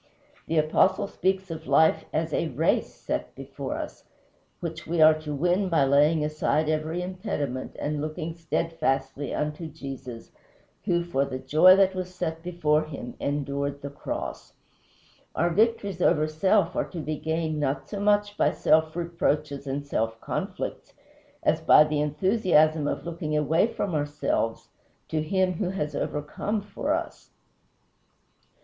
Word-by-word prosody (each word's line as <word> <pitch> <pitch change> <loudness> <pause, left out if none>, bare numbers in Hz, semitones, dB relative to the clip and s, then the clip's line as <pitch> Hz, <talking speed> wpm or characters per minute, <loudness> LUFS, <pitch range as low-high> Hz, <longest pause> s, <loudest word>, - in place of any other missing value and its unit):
The 165 - 0
Apostle 155 +6 +3
speaks 190 -1 -1
of 160 -1 -7
life 160 0 +4
as - - -1
a - - +1
race - - +1
set - - -4
before - - -6
us, - - -7 0.5
which - - -6
we 170 +1 -1
are 155 0 +8
to 155 -1 -6
win 180 +6 +1
by 165 -5 +3
laying 150 +3 +4
aside 155 0 0
every 155 +3 -1
impediment 180 - -4
and 150 0 -2
looking 155 +2 -4
steadfastly 145 -5 -2
unto 150 +2 -3
Jesus, 135 -6 -8 0.5
who, 175 -1 +2
"for 155 -6 0
the 130 -2 -4
joy 165 +7 +6
that 190 -1 +4
was 185 -1 -5
set 165 -2 -3
before 155 -3 +1
him, 140 -5 -7
endured 140 0 -2
the 140 - -5
cross." - - -6 0.8
Our 175 - +2
victories 200 -2 +1
over 155 -3 +3
self 185 +3 +2
are - - 0
to 175 - -6
be 155 0 -3
gained 160 -1 -2
not 135 -1 -1
so 205 - -5
much 205 0 +2
by - - +3
self 160 0 +2
reproaches 155 -4 -1
and 140 +1 -3
self 115 -4 -2
conflicts - - -4 0.5
as - - +2
by 150 - +7
the 150 -1 -1
enthusiasm 155 -1 +2
of - - -3
looking 160 -3 -2
away 155 - +3
from 200 -5 -3
ourselves 145 -6 -1 0.4
to 155 - 0
Him 185 +3 +1
who 180 +2 -2
has 150 -6 -3
overcome 150 +8 -2
for 205 - -4
us. - - -3
155 Hz, 150 wpm, -26 LUFS, 145-180 Hz, 0.8 s, are